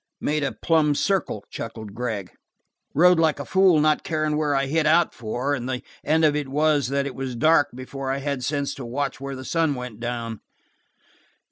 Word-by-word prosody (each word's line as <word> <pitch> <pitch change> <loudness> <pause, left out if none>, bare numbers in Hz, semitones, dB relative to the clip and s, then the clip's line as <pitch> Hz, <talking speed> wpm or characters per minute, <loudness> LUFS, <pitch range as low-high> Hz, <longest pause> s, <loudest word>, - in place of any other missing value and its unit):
"Made 150 0 0
a 140 - 0
plumb 155 -3 +2
circle," 185 - 0
chuckled 110 -3 -7
Gregg. 110 -5 -4 0.6
"Rode 180 +3 +6
like 160 -3 +2
a 140 - -4
fool 190 -4 +4
not 155 0 +2
carin' 155 -2 -1
where 150 -2 +1
I 135 0 +2
hit 155 +3 +1
out 165 +2 +4
for, 120 +5 -2
and 125 -2 -3
the 125 -1 -3 0.2
end 160 +1 +3
of 150 -1 +3
it 150 -2 -2
was 150 0 +2
that 140 +1 0
it 140 - -4
was 130 -1 -4
dark 155 +4 +4
before 130 +1 -6
I'd 135 0 -3
had 140 -3 -2
sense 140 +1 -1
to 140 - -8
watch 135 +3 -3
where 140 0 -5
the 130 0 -8
sun 160 -2 +1
went 125 -4 -7
down." 115 -2 -4
140 Hz, 200 wpm, -24 LUFS, 125-155 Hz, 0.6 s, Rode